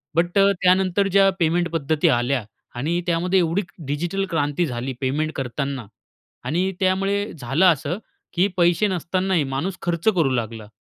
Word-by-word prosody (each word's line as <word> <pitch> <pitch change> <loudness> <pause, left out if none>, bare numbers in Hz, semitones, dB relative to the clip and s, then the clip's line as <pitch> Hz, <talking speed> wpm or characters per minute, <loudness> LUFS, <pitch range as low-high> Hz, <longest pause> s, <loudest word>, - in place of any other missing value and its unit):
But 175 +3 +1
अ, 195 0 +5
त्यानंतर 185 +1 +3
ज्या 195 0 +5
payment 170 +1 +1
पद्धती 155 -1 +1
आल्या 125 0 0 0.3
आणि 160 +8 -1
त्यामध्ये 180 +2 +2
एवढी 170 +2 +1 0.2
डिजिटल 170 +8 -2
क्रांती 155 0 0
झाली 125 -1 -4
पेमेंट 150 +4 0
करतांना. 135 0 -3 0.6
आणि 180 +4 0
त्यामुळे 195 +2 +1
झालं 135 +8 +1
असं, 165 -1 +2 0.4
की 180 +3 +3
पैसे 175 +4 +3
नसतानाही 185 -1 0
माणूस 140 +8 -3
खर्च 170 +2 -2
करू 160 -6 +3
लागला. 115 -2 -4
170 Hz, 145 wpm, -22 LUFS, 140-185 Hz, 0.6 s, अ